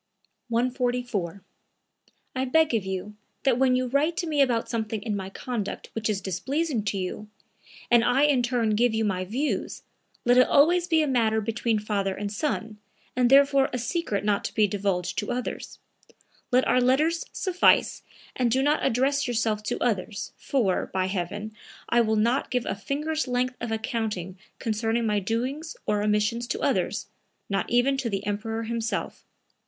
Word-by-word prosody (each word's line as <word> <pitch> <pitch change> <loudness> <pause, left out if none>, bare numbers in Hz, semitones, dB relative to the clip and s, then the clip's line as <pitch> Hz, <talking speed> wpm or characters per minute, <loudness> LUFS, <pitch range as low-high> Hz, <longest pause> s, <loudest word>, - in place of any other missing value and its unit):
144. 245 -6 -1 0.9
"I 260 - 0
beg 315 +2 +3
of 220 -4 +1
you 190 +2 -4 0.3
that 255 -3 +2
when 260 -1 +4
you 255 0 +1
write 285 +6 +1
to 350 - -1
me 300 -3 +1
about 240 -4 +2
something 220 -2 -2
in 215 -3 -2
my 190 -1 -4
conduct 220 0 -5
which 225 -1 -2
is 200 -2 -1
displeasing 260 - -1
to 200 -1 -1
you, 190 +3 -4 0.6
and 235 -1 +6
I 265 +4 +3
in 285 -4 +4
turn 240 -2 +1
give 225 +2 +2
you 220 0 +1
my 185 -2 -1
views, 255 +10 -2 0.4
let 245 +1 +5
it 255 - +6
always 345 +5 +4
be 320 -3 +3
a - - 0
matter 225 -4 +2
between 225 +1 0
father 200 -2 -1
and 205 0 -4
son, 220 -5 -3 0.4
and 250 -1 +3
therefore 275 0 +5
a 250 - -2
secret 240 - -2
not 205 -1 +1
to - - -4
be 215 - +5
divulged 190 -3 -1
to 205 - -4
others. 250 0 -4 0.7
Let 250 +1 +3
our 255 - +4
letters 305 +7 +2
suffice 365 -2 +3 0.3
and 250 -2 +1
do 260 +3 +2
not 295 +2 +2
address 275 +4 +1
yourself 225 -3 0
to 245 - -1
others, 210 -3 -2
for, 225 -9 0
by 185 -1 0
heaven, 200 +3 -4 0.4
I 235 - +4
will 220 -1 +1
not 235 +5 +1
give 250 -2 -1
a - - -1
finger's 300 +8 -2
length 250 0 0
of 235 -1 -3
accounting 215 -5 -3 0.2
concerning 225 0 -1
my 210 -1 +1
doings 255 - -3
or 210 -1 +1
omissions 210 +3 +1
to - - -2
others, - - 0 0.4
not 195 -1 -1
even 250 +3 +3
to 260 -3 -2
the 200 -1 -3
Emperor 225 +2 -2
himself. 230 0 -3
235 Hz, 170 wpm, -26 LUFS, 210-260 Hz, 0.9 s, and